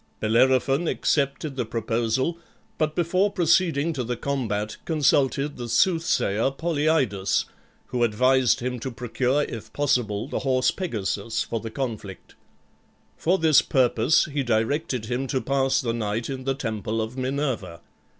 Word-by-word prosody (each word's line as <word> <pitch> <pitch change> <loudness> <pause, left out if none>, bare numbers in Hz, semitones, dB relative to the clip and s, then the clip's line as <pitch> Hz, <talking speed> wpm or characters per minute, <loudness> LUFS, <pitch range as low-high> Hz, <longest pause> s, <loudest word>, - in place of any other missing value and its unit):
Bellerophon 130 +7 +2
accepted 140 0 0
the 130 - -1
proposal, 115 +7 -1 0.4
but 155 0 0
before 185 +4 +1
proceeding 165 -3 +2
to 130 -4 -3
the 120 0 -3
combat 110 -6 -2
consulted 145 -2 +1
the 120 -1 -6
soothsayer 150 - +2
Polyidus, 145 - 0 0.4
who 125 -1 0
advised 125 +3 +3
him 125 0 -3
to 130 - -4
procure 125 +4 0
if 115 -6 -7
possible 120 -7 0
the - - -3
horse 130 -1 +2
Pegasus 110 - -2
for 115 - -3
the 115 - -6
conflict. 110 -7 -6 0.8
For 180 +4 +1
this 160 -4 +5
purpose 125 +1 +3
he 145 -3 -2
directed 120 +1 0
him 125 +3 -2
to 130 0 0
pass 135 0 +1
the 115 -2 -1
night 110 +1 -2
in 130 -1 -6
the 135 0 0
temple 110 -3 -3
of 110 +2 -3
Minerva. 130 - -3
130 Hz, 140 wpm, -25 LUFS, 115-145 Hz, 0.8 s, this